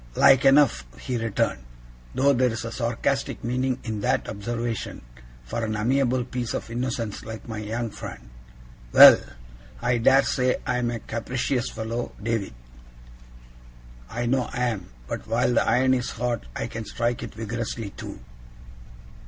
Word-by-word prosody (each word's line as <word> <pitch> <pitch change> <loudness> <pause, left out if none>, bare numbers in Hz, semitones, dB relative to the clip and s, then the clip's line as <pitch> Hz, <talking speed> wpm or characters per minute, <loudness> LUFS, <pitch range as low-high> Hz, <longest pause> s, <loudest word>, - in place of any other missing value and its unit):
'Like 135 -1 +6
enough,' 135 - +5
he 125 - -4
returned; 115 - -1 0.5
'though 140 +1 +4
there's 120 -3 +1
a 115 - -4
sarcastic 120 +5 -1
meaning 125 +2 0
in 110 -3 -4
that - - +1
observation 115 - -4 0.4
for 60 - -4
an 110 -1 -1
amiable 125 +3 +1
piece 125 -1 -3
of - - -5
innocence 115 -3 -3
like 110 +1 -8
my 110 -2 -5
young 110 +2 -3
friend. - - -9 0.6
Well! - - +11 0.6
I 120 - +1
dare 135 +3 +5
say 125 -1 +1
I 125 -2 0
am 120 -1 0
a 120 - -2
capricious 125 +2 -2
fellow, 115 +2 -4
David. 110 - -2 1.5
I 120 +1 -3
know 125 +1 +1
I 125 -4 0
am; 100 -6 -5 0.2
but - - -6
while 125 - +2
the - - +4
iron 130 +1 +4
is 125 -1 0
hot, 120 - -3
I - - -2
can 115 -1 -6
strike 120 +3 -1
it - - -7
vigorously 115 -1 -4
too. - - -8
120 Hz, 150 wpm, -25 LUFS, 110-125 Hz, 1.5 s, Well